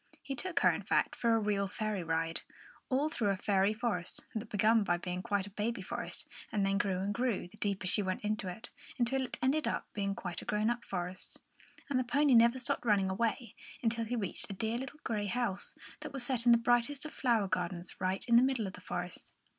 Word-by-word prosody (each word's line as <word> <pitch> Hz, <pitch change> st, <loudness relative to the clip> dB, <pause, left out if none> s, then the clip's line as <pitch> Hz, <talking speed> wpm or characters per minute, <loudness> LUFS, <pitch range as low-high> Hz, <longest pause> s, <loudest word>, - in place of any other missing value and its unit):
He 275 Hz, -, -3 dB
took 350 Hz, +6 st, -1 dB
her, -, -, +6 dB
in -, -, -3 dB
fact, -, -, +1 dB
for 230 Hz, -1 st, +3 dB
a -, -, +3 dB
real 205 Hz, -2 st, +1 dB
fairy 215 Hz, 0 st, -2 dB
ride, 165 Hz, 0 st, 0 dB, 0.5 s
all 270 Hz, +3 st, +2 dB
through 230 Hz, -9 st, 0 dB
a 195 Hz, -, +1 dB
fairy 195 Hz, 0 st, +3 dB
forest, 215 Hz, -6 st, -2 dB
that 220 Hz, 0 st, -4 dB
began 215 Hz, +1 st, +4 dB
by 175 Hz, -3 st, +1 dB
being 180 Hz, +1 st, -4 dB
quite 205 Hz, -2 st, 0 dB
a 205 Hz, -, -10 dB
baby 210 Hz, +1 st, -2 dB
forest -, -, -4 dB, 0.2 s
and 205 Hz, -3 st, +1 dB
then 195 Hz, +1 st, +2 dB
grew 195 Hz, -3 st, +1 dB
and 195 Hz, +2 st, -1 dB
grew, 235 Hz, -5 st, 0 dB
the 215 Hz, -, -17 dB
deeper 200 Hz, -3 st, -1 dB
she 185 Hz, +3 st, +4 dB
went 185 Hz, 0 st, -2 dB
into 210 Hz, -2 st, -1 dB
it, 220 Hz, +6 st, -7 dB, 0.3 s
until 260 Hz, +2 st, +1 dB
it 260 Hz, -, -4 dB
ended 285 Hz, +4 st, +2 dB
in -, -, +2 dB, 0.2 s
being 200 Hz, -1 st, -1 dB
quite 180 Hz, -2 st, -4 dB
a -, -, -10 dB
grown 210 Hz, +2 st, +1 dB
up 240 Hz, 0 st, -3 dB
forest. 180 Hz, 0 st, -4 dB, 0.5 s
And 275 Hz, -4 st, +1 dB
the -, -, +2 dB
pony 280 Hz, +3 st, +3 dB
never 235 Hz, +2 st, +6 dB
stopped 255 Hz, -, -1 dB
running 200 Hz, -4 st, +3 dB
away 230 Hz, +2 st, -1 dB, 0.3 s
until 230 Hz, 0 st, +1 dB
he 240 Hz, +3 st, -2 dB
reached 215 Hz, -2 st, -2 dB
a -, -, -4 dB
dear 225 Hz, +4 st, -1 dB
little 270 Hz, +3 st, -7 dB
grey 210 Hz, -2 st, -1 dB
house, 205 Hz, -3 st, -2 dB, 0.2 s
that -, -, -7 dB
was 270 Hz, -3 st, 0 dB
set 245 Hz, -2 st, 0 dB
in -, -, +9 dB
the 235 Hz, -, +8 dB
brightest 240 Hz, +5 st, +2 dB
of 310 Hz, -, -6 dB
flower 230 Hz, -6 st, +2 dB
gardens, 180 Hz, -1 st, -3 dB
right 185 Hz, +3 st, 0 dB
in 235 Hz, -1 st, +6 dB
the -, -, +8 dB
middle 260 Hz, -4 st, +2 dB
of 190 Hz, -, -5 dB
the 185 Hz, -, -11 dB
forest. 180 Hz, -1 st, -6 dB
215 Hz, 230 wpm, -33 LUFS, 190-240 Hz, 0.5 s, in